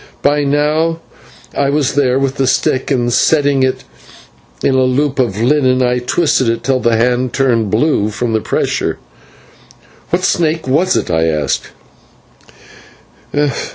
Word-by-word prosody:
By 145 +1 +2
now 150 +3 0 0.6
I 140 -1 +1
was 140 -1 0
there 135 -2 +2
with 135 0 -1
the 135 - +1
stick, 130 0 0
and, 120 -4 0
setting 145 -2 +2
it 130 0 0 0.8
in - - +2
the 130 - +2
loop 135 +2 0
of 110 -6 0
linen, 130 0 +2
I 125 0 +1
twisted 130 -1 +1
it 115 0 -2
till 130 +1 +1
the 120 -2 +1
hand 125 +2 0
turned 120 -6 +1
blue 110 -2 +1
from 115 +2 -3
the 110 - 0
pressure. - - -2 1.1
"What 180 +1 -1
snake 160 -4 0
was 170 +8 +2
it?" - - -2
I 80 0 +1
asked. 75 -4 -1
130 Hz, 145 wpm, -15 LUFS, 120-145 Hz, 1.1 s, By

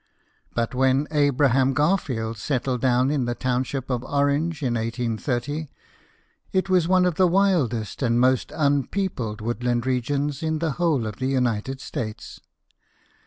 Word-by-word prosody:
But 115 0 -1
when 130 +3 +2
Abram 135 -3 +3
Garfield 130 - 0
settled 125 -1 -1
down 130 +1 +3
in 140 -4 0
the 120 0 -2
township 130 +1 -2
of 125 -1 -1
Orange 145 +3 0
in 125 -3 0
1830, 120 +5 -2 0.8
it 190 0 0
was 180 -3 +3
one 185 0 +4
of 180 -3 0
the 185 - +5
wildest 170 - +1
and 120 -2 +2
most 130 0 +2
un 140 -3 +1
peopled 125 - -3
woodland 120 +1 -1
regions 140 +3 -1
in 160 -1 -1
the 160 0 -1
whole 155 -6 +1
of 105 -2 -5
the 130 - -2
United 130 -1 -1
States. 110 -2 -6
130 Hz, 145 wpm, -24 LUFS, 120-150 Hz, 0.8 s, the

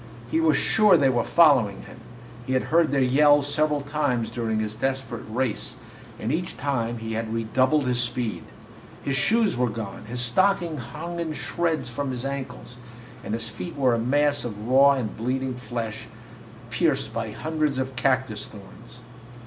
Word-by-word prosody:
He 320 - +2
was 325 - +4
sure 210 -5 +4
they 135 -3 +3
were 120 -2 +1
following 135 - +4
him - - -12 0.5
he 130 - -1
had 130 - +2
heard 165 -1 +5
their 135 -1 +2
yells 145 +2 +5
several 150 0 +1
times 140 -5 -1
during 110 -2 -1
his 110 -1 -2
desperate 130 0 -3
race, 120 0 -2 0.4
and 110 - -2
each 175 +3 -3
time 120 -5 -1
he 115 0 -5
had 110 0 -3
redoubled 130 +6 +1
his 125 -1 0
speed. 120 -2 -2 0.6
His 140 - -1
shoes 220 - +2
were 125 0 +1
gone, 105 -2 -6
his 120 +3 -5
stockings 170 +4 +1
hung 160 +8 -6
in 165 -2 -2
shreds 160 -4 -1
from 140 +3 -3
his 125 0 -4
ankles, 130 - -6 0.5
and 110 - -2
his 115 0 -3
feet 160 +9 -7
were 130 -4 +2
a 115 - +1
mass 145 +4 +2
of 105 -2 -6
raw 135 +2 +6
and 125 -6 -3
bleeding 130 +3 -2
flesh, 120 -3 -5 0.6
pierced - - 0
by 110 - -3
hundreds 150 +5 -1
of 130 0 -3
cactus 130 -4 0
thorns. 115 +4 -14
130 Hz, 170 wpm, -25 LUFS, 115-145 Hz, 0.6 s, raw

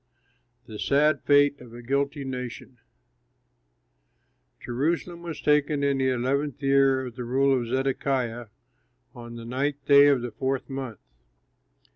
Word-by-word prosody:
THE 110 -3 -9
SAD 145 +1 +2
FATE 145 -1 +4
OF 120 -2 -13
A 120 - -10
GUILTY 140 +2 -1
NATION 125 -1 -7 1.8
Jerusalem 165 +7 -2
was 170 -2 -7
taken 150 -1 +2
in 140 -1 +1
the 130 0 +2
eleventh 135 +3 -1
year 135 -1 +3
of 125 -2 -8
the 125 - -5
rule 135 +3 +2
of 120 -2 -2
Zedekiah, 130 -2 -1 0.7
on 120 -1 -10
the 115 -1 -9
ninth 135 +3 -3
day 140 0 +7
of 135 -4 +2
the 120 - -4
fourth 130 +4 -3
month. 130 -5 -5
135 Hz, 135 wpm, -26 LUFS, 125-140 Hz, 1.8 s, day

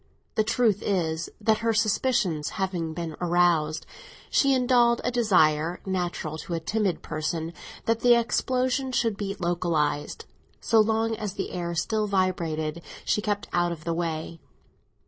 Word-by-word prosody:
The 215 - +2
truth 220 -2 +2
is, 165 -4 -1
that 220 0 +2
her 225 0 +1
suspicions 210 - +1
having 175 -4 -2
been 165 -2 -4
aroused, 170 -3 +2 0.5
she 275 -1 +4
indulged 245 -2 +3
a - - 0
desire, 175 -8 +3
natural 175 -4 -3
to 170 +2 -4
a - - -1
timid 200 +2 -1
person, 160 +1 -3 0.3
that 230 0 +1
the 240 0 +5
explosion 255 +3 0
should 230 -3 +1
be 200 -1 -4
localised. 165 -4 -1 0.3
So 225 - +3
long 225 +1 +2
as 205 -2 -4
the - - -3
air 170 -1 -3
still 215 +6 0
vibrated 170 -5 -1 0.2
she 210 - +1
kept 205 -1 -2
out 175 0 +2
of 160 -3 -7
the 170 - -1
way. 165 -1 -3
185 Hz, 145 wpm, -26 LUFS, 165-220 Hz, 0.5 s, the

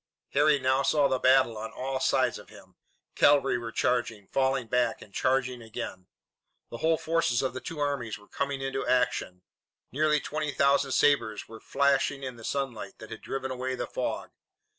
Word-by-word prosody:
Harry 150 +1 +4
now 130 0 +2
saw 140 +1 +3
the 130 -1 0
battle 130 -4 +4
on 110 +1 -6
all 130 +3 -3
sides - - +1
of - - -15
him. - - -16 0.4
Cavalry 140 -3 +4
were 115 -1 -6
charging, 115 -4 0
falling 135 -1 +1
back, 120 0 0
and 100 - -14
charging 130 0 0
again. 95 -4 -7 0.6
The 115 - -6
whole 160 +3 +2
forces 160 -8 +1
of 130 - -1
the 130 - -6
two 165 - -7
armies 140 -6 -2
were 105 - -19
coming 140 -1 -3
into 135 0 -2
action. 125 -7 0 0.5
Nearly 150 +2 +2
twenty 150 0 -3
thousand 140 -1 +2
sabres 110 -7 +2
were 110 0 -11
flashing 140 0 +1
in 130 -2 -5
the 115 - -13
sunlight 135 -3 -4
that 110 - -11
had 110 - -7
driven 130 -1 -4
away 130 0 -3
the - - -3
fog. - - -4
130 Hz, 180 wpm, -28 LUFS, 120-140 Hz, 0.6 s, Harry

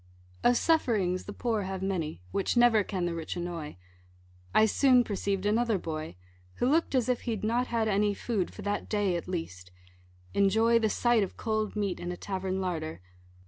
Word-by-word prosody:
Of 245 0 +5
sufferings 215 - +1
the - - -6
poor 225 0 -1
have 190 -1 -4
many, 165 - -3
Which 200 +4 0
never 240 -3 +5
can 185 -3 -2
the 175 - -1
rich 165 -1 -5
annoy: 170 - -5 0.7
I 215 - +5
soon 250 +2 +4
perceiv'd 200 -2 -2
another 225 +1 +2
boy, 155 - -5 0.4
Who 245 - 0
look'd 320 -2 +2
as 250 -3 +2
if 250 -2 0
he'd 220 -3 -2
not 240 +3 +1
had 230 -2 0
any 205 0 +2
Food, 210 -5 -2
for 210 - -10
that 205 +1 -2
day 205 -4 +1
at 170 - -4
least 95 - -5 0.6
enjoy 220 +4 +4
The 220 -1 +1
sight 240 +1 +2
of 195 - -3
cold 215 -1 -1
meat 200 -3 -1
in 175 - -4
a 175 - -5
tavern 190 -1 -3
larder. 160 -4 -3
205 Hz, 185 wpm, -29 LUFS, 180-230 Hz, 0.7 s, Of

